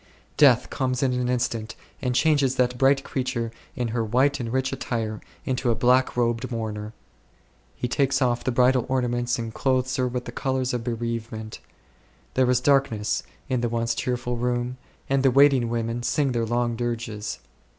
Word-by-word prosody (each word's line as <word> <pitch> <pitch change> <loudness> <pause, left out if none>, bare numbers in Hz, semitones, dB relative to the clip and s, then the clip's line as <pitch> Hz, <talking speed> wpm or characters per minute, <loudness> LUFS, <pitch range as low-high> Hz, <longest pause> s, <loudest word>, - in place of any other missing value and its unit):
Death 125 -4 +5
comes 130 -1 -1
in 130 -2 +2
an 125 0 -1
instant 115 -3 -1 0.3
and 125 -1 -1
changes 140 -3 +3
that 125 -1 +1
bright 135 0 +4
creature 125 -3 -2 0.2
in 120 -2 -2
her 115 0 -1
white 130 +6 +2
and 115 -2 -3
rich 130 +1 0
attire 110 -3 -3 0.2
into 130 -3 0
a 115 - +2
black 125 +2 +3
robed 120 +1 0
mourner. 110 -2 -4 0.8
He 125 - -2
takes 135 +1 +1
off 120 -3 +1
the 130 - 0
bridal 125 0 +3
ornaments 120 -1 0
and 115 -1 -5
clothes 130 0 0
her 130 -1 +1
with 125 0 -4
the - - -6
colours 130 0 -1
of 120 -2 -2
bereavement. 115 -2 -4 0.7
There 130 -1 +3
is 125 -1 +3
darkness 125 -6 +2 0.3
in 125 -2 0
the 120 - 0
once 115 0 0
cheerful 125 -1 -2
room, 125 +1 -1 0.3
and 135 0 +2
the 135 - +5
waiting 135 -2 +5
women 115 0 -2
sing 135 +3 +1
their 115 -2 -1
long 120 0 0
dirges. 115 -3 -3
125 Hz, 170 wpm, -25 LUFS, 115-130 Hz, 0.8 s, Death